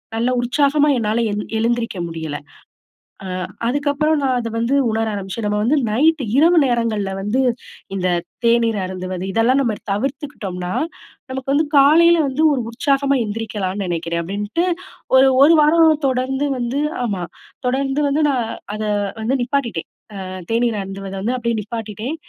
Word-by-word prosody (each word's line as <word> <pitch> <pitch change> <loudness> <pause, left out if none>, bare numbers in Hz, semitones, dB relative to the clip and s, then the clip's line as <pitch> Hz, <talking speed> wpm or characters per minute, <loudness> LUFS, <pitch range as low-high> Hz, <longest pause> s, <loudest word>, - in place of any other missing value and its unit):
நல்ல 235 +2 +1
உற்சாகமா 285 +4 +2
என்னால 220 0 0
எழுந் 210 0 -4
எழுந்திரிக்க 230 -2 -1
முடியல. 160 -3 -5 0.9
ஆ - - -6 0.4
அதுக்கப்பறம் 290 +4 +1
நான் 260 -2 +1
அத 230 -1 -3
வந்து 235 +4 0 0.2
உணர 225 0 0
ஆரம்பிச்சேன். 200 +3 -5
நம்ம 210 0 0
வந்து 260 +7 +2
நைட்டு 300 +4 +2
இரவு 335 +5 +5
நேரங்கள்ல 230 -5 0
வந்து, 215 +7 0 0.5
இந்த 185 -1 -1 0.4
தேநீர 230 -1 +3
அருந்துவது 185 0 -5
இதெல்லாம் 235 +6 +3
நம்ம 230 -4 0 0.2
தவிர்த்துக்கிட்டோம்ன்னா, 205 -7 -3 0.6
நமக்கு 265 +1 -3
வந்து 305 +3 +3
காலையில 325 +5 +6
வந்து 270 +4 -1
ஒரு 265 - 0
உற்சாகமா 275 +2 +1
எந்திரிக்கலான்னு 205 -3 -3
நெனைக்கிறேன் 170 -1 -2
அப்பிடின்ட்டு, 205 - -2 0.5
ஒரு, 265 +1 +7
ஒரு 305 +4 +7
வாரம் 315 0 +4
தொடர்ந்து 265 +2 0
வந்து 240 +3 -2 0.3
ஆமா 200 -6 -2 0.4
தொடர்ந்து 270 +2 0
வந்து 295 +3 +1
நான் 250 -3 0 0.3
அத 215 - -4 0.4
வந்து 250 +5 +1
நிப்பாட்டிட்டேன், 245 - -2 0.3
ஆ - - -6 0.3
தேநீர் 230 0 +1
அருந்துவத 195 0 -7
வந்து 240 +5 0
அப்பிடியே 235 -2 -1
நிப்பாட்டிட்டேன், 220 +4 -5
235 Hz, 140 wpm, -20 LUFS, 210-275 Hz, 0.9 s, ஒரு